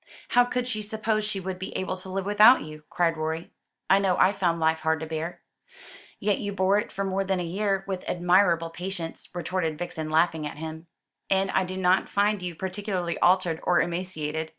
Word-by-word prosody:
"How 245 Hz, 0 st, +5 dB
could 250 Hz, 0 st, -2 dB
she 220 Hz, -4 st, -3 dB
suppose 215 Hz, 0 st, -1 dB
she 210 Hz, -2 st, -3 dB
would 185 Hz, 0 st, -5 dB
be 190 Hz, -, -5 dB
able 185 Hz, 0 st, -2 dB
to 185 Hz, +1 st, -10 dB
live 190 Hz, 0 st, -3 dB
without 210 Hz, +5 st, +6 dB
you!" 155 Hz, 0 st, -10 dB
cried 165 Hz, -2 st, +1 dB
Rorie. 160 Hz, +2 st, -3 dB, 0.4 s
"I 195 Hz, -, +5 dB
know 190 Hz, -2 st, +1 dB
I 190 Hz, -, +4 dB
found 175 Hz, -4 st, 0 dB
life 160 Hz, 0 st, +2 dB
hard 160 Hz, 0 st, +1 dB
to -, -, -3 dB
bear." 160 Hz, +2 st, -5 dB, 0.8 s
"Yet 205 Hz, 0 st, +1 dB
you 205 Hz, -1 st, -3 dB
bore 195 Hz, +1 st, +3 dB
it -, -, -5 dB
for 195 Hz, -, -3 dB
more 195 Hz, 0 st, 0 dB
than 190 Hz, -1 st, -1 dB
a -, -, -1 dB
year 195 Hz, +3 st, -1 dB
with 190 Hz, -2 st, -4 dB
admirable 175 Hz, -2 st, +3 dB
patience," 175 Hz, -1 st, -6 dB
retorted 170 Hz, -2 st, -2 dB
Vixen, 160 Hz, -2 st, -5 dB
laughing 160 Hz, -1 st, +2 dB
at 145 Hz, -, -9 dB
him; 160 Hz, +1 st, -7 dB, 0.4 s
"and 195 Hz, 0 st, +2 dB
I 190 Hz, -, +2 dB
do 185 Hz, +1 st, -6 dB
not 185 Hz, 0 st, +2 dB
find 205 Hz, 0 st, +1 dB
you 175 Hz, -2 st, -4 dB
particularly 190 Hz, -1 st, -3 dB
altered 175 Hz, -3 st, +3 dB
or 180 Hz, -, +3 dB
emaciated." 160 Hz, -3 st, -2 dB
185 Hz, 200 wpm, -26 LUFS, 165-195 Hz, 0.8 s, without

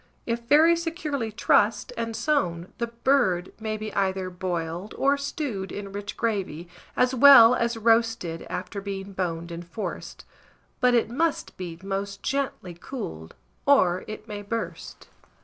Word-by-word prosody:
If 230 Hz, 0 st, -1 dB
very 320 Hz, +5 st, +6 dB
securely 320 Hz, -8 st, -3 dB
trussed, 215 Hz, 0 st, +2 dB
and 230 Hz, -1 st, -3 dB
sewn, 190 Hz, -, -1 dB
the 235 Hz, -, 0 dB
bird 230 Hz, -7 st, +1 dB
may 220 Hz, -1 st, -3 dB
be 215 Hz, 0 st, -6 dB
either 190 Hz, -1 st, -1 dB
boiled, 175 Hz, +1 st, -4 dB
or 280 Hz, +1 st, +3 dB
stewed 280 Hz, -, -4 dB
in 200 Hz, -1 st, -6 dB
rich 205 Hz, +1 st, -6 dB
gravy, 195 Hz, -7 st, -2 dB, 0.3 s
as 250 Hz, +1 st, +3 dB
well 255 Hz, -3 st, +9 dB
as 235 Hz, -1 st, 0 dB
roasted, 225 Hz, -7 st, +1 dB
after 195 Hz, +2 st, -5 dB
being 195 Hz, 0 st, -6 dB
boned 170 Hz, -2 st, -3 dB
and 170 Hz, +1 st, -6 dB
forced; 175 Hz, +5 st, -6 dB, 0.5 s
but 250 Hz, -1 st, +4 dB
it 230 Hz, -1 st, +1 dB
must 320 Hz, +5 st, -1 dB
be 175 Hz, -3 st, -6 dB
most 195 Hz, 0 st, -4 dB
gently 275 Hz, -10 st, -2 dB
cooled, 125 Hz, -, -7 dB, 0.3 s
or 185 Hz, -11 st, +4 dB
it 215 Hz, +1 st, -8 dB
may 205 Hz, -1 st, -6 dB
burst. 225 Hz, +3 st, -6 dB
215 Hz, 145 wpm, -26 LUFS, 185-245 Hz, 0.5 s, well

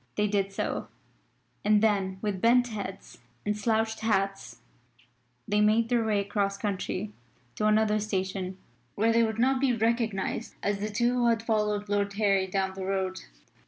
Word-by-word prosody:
They 210 Hz, -, +2 dB
did 200 Hz, -1 st, 0 dB
so, 195 Hz, -, -3 dB, 0.8 s
and 210 Hz, 0 st, +4 dB
then 195 Hz, -3 st, +1 dB
with 200 Hz, -3 st, -2 dB
bent 245 Hz, +1 st, +4 dB
heads 200 Hz, -, -7 dB, 0.3 s
and 210 Hz, 0 st, 0 dB
slouched 220 Hz, +1 st, 0 dB
hats, 195 Hz, -3 st, -1 dB, 0.9 s
they 210 Hz, 0 st, +2 dB
made 220 Hz, +2 st, +3 dB
their 240 Hz, -2 st, +2 dB
way 215 Hz, -2 st, +1 dB
across 200 Hz, -1 st, -1 dB
country 200 Hz, 0 st, -3 dB, 0.4 s
to 215 Hz, -, 0 dB
another 215 Hz, 0 st, +3 dB
station 190 Hz, -2 st, -3 dB, 0.4 s
where 225 Hz, +2 st, +2 dB
they 230 Hz, -, +4 dB
would 220 Hz, -1 st, 0 dB
not 260 Hz, +2 st, +2 dB
be 265 Hz, -3 st, +3 dB
recognised 225 Hz, -3 st, -1 dB
as 200 Hz, 0 st, 0 dB
the 210 Hz, +1 st, -2 dB
two 240 Hz, +3 st, +1 dB
who 240 Hz, -1 st, +3 dB
had 230 Hz, -1 st, +2 dB
followed 210 Hz, -2 st, 0 dB
Lord 200 Hz, 0 st, 0 dB
Harry 200 Hz, -2 st, +2 dB
down 190 Hz, 0 st, -1 dB
the 190 Hz, 0 st, -6 dB
road. 190 Hz, -1 st, -1 dB
210 Hz, 160 wpm, -28 LUFS, 195-225 Hz, 0.9 s, and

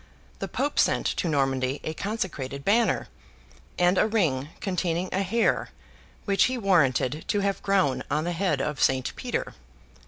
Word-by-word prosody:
The -, -, -3 dB
Pope 285 Hz, +2 st, -1 dB
sent -, -, +2 dB
to -, -, -1 dB
Normandy 135 Hz, -2 st, 0 dB
a 155 Hz, -, -3 dB
consecrated 155 Hz, -, -4 dB
banner, 225 Hz, +3 st, +2 dB, 0.7 s
and 180 Hz, +1 st, +3 dB
a -, -, +4 dB
ring 155 Hz, -11 st, 0 dB
containing 180 Hz, -1 st, -1 dB
a 190 Hz, -, +1 dB
hair 225 Hz, +5 st, +1 dB, 0.6 s
which 195 Hz, -2 st, +3 dB
he 255 Hz, 0 st, -1 dB
warranted 155 Hz, -, +2 dB
to 205 Hz, -, +1 dB
have 200 Hz, 0 st, -1 dB
grown 190 Hz, -9 st, +2 dB
on 150 Hz, +2 st, 0 dB
the 175 Hz, -, -2 dB
head 175 Hz, -5 st, 0 dB
of 150 Hz, -1 st, -3 dB
Saint 130 Hz, -1 st, +1 dB
Peter. -, -, -3 dB
175 Hz, 155 wpm, -26 LUFS, 140-200 Hz, 0.7 s, a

